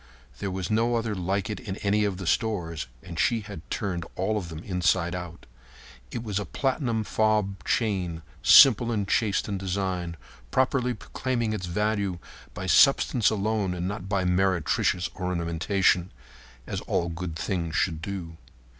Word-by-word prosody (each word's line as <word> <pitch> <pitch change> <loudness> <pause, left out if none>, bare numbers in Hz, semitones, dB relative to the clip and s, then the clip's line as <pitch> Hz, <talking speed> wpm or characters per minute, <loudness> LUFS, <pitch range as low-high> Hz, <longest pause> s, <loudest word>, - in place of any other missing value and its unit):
There 100 - -2
was 95 -1 -3
no 115 +2 +2
other 115 -2 -1
like 95 +1 -1
it 105 - -4
in 100 -5 -5
any 105 +1 +2
of 100 -3 -1
the 95 - -6
stores, 85 - -1 0.2
and 85 -3 -7
she 115 -2 +2
had 100 -5 -8
turned 90 -4 -2
all 95 +4 0
of 95 -5 -3
them 80 0 -8
inside 90 -2 +1
out. 90 -1 -7 0.6
It 115 - -5
was 105 -3 -2
a - - -2
platinum 125 - -1
fob 105 -3 +1
chain 90 -8 -1 0.2
simple 120 -3 +8
and 105 -3 -1
chaste 105 -1 +1
in 100 -2 -3
design, 90 -3 -2 0.3
properly 125 - +1
proclaiming 120 -4 -2
its 90 -4 -4
value 100 0 0 0.4
by 90 - -5
substance 125 +1 +5
alone 105 -3 0
and 90 0 -2
not 100 -1 -5
by 95 -2 +1
meretricious 90 -1 +1
ornamentation—as 85 - -2
all 85 - 0
good 85 -1 -5
things 85 -1 -2
should 80 -3 0
do. 85 -3 -6
95 Hz, 155 wpm, -26 LUFS, 85-110 Hz, 0.6 s, simple